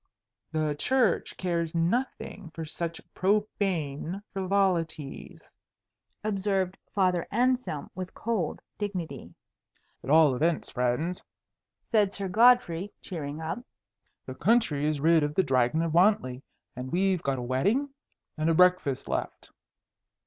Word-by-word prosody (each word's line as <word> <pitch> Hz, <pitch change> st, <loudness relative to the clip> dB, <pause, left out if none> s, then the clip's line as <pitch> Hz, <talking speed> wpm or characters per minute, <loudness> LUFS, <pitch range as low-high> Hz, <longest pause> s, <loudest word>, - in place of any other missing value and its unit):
"The 155 Hz, -2 st, 0 dB
Church 255 Hz, -8 st, +1 dB
cares 170 Hz, -2 st, -1 dB
nothing 195 Hz, +1 st, -1 dB
for 165 Hz, -, -4 dB
such 165 Hz, +1 st, -4 dB
profane 190 Hz, -4 st, -1 dB
frivolities," 185 Hz, -6 st, -1 dB, 0.8 s
observed 195 Hz, -3 st, 0 dB, 0.2 s
Father 185 Hz, -4 st, +2 dB
Anselm 245 Hz, -, 0 dB
with 185 Hz, 0 st, -7 dB
cold 210 Hz, -9 st, -2 dB, 0.2 s
dignity. 195 Hz, -5 st, -5 dB, 0.7 s
"At -, -, -7 dB
all 155 Hz, -2 st, +6 dB
events, 165 Hz, +5 st, 0 dB
friends," 125 Hz, +8 st, -1 dB, 0.7 s
said 210 Hz, -4 st, +3 dB
Sir 200 Hz, -1 st, -2 dB
Godfrey, 205 Hz, -3 st, +4 dB
cheering 155 Hz, -4 st, -6 dB
up, 165 Hz, +6 st, -3 dB, 0.7 s
"the -, -, -6 dB
country 165 Hz, -11 st, +2 dB
is 155 Hz, -2 st, 0 dB
rid 165 Hz, +2 st, +4 dB
of 150 Hz, 0 st, -1 dB
the 190 Hz, -, +4 dB
Dragon 130 Hz, +2 st, +2 dB
of 165 Hz, -2 st, -2 dB
Wantley, 170 Hz, -9 st, +3 dB, 0.3 s
and 125 Hz, +1 st, -6 dB
we've 185 Hz, 0 st, +2 dB
got 135 Hz, -1 st, -1 dB
a 125 Hz, -, -4 dB
wedding 195 Hz, -, +1 dB, 0.5 s
and 155 Hz, +1 st, +2 dB
a 165 Hz, -, +3 dB
breakfast 180 Hz, -6 st, +3 dB
left." -, -, -4 dB
170 Hz, 120 wpm, -28 LUFS, 155-200 Hz, 0.8 s, all